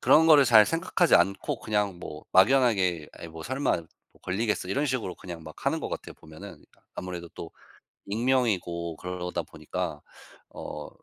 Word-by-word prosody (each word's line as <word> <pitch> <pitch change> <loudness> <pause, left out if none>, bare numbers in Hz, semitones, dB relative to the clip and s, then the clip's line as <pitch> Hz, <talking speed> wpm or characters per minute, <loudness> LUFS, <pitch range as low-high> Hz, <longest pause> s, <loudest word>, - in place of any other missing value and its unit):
그런 160 +1 +6
거를 150 -3 +7
잘 110 -4 +7
생각하지 170 +1 +2
않고 100 0 +2
그냥 105 -4 -1
뭐 75 -3 -9
막연하게 95 - +4
'에이 85 - -8
뭐 80 0 -9
설마 130 - -1 0.4
걸리겠어?' 105 0 -1
이런 140 +10 0
식으로 125 -9 -2
그냥 85 -3 -9
막 - - -12
하는 - - +1
것 - - -4
같아요, - - -6
보면은. 80 0 -12 0.3
아무래도 90 -2 -6
또 80 - -8 0.6
익명이고 100 -8 0
그러다 90 0 -4
보니까 75 -1 -5 0.5
어 - - -7
95 Hz, 325 characters per minute, -27 LUFS, 85-125 Hz, 0.6 s, 거를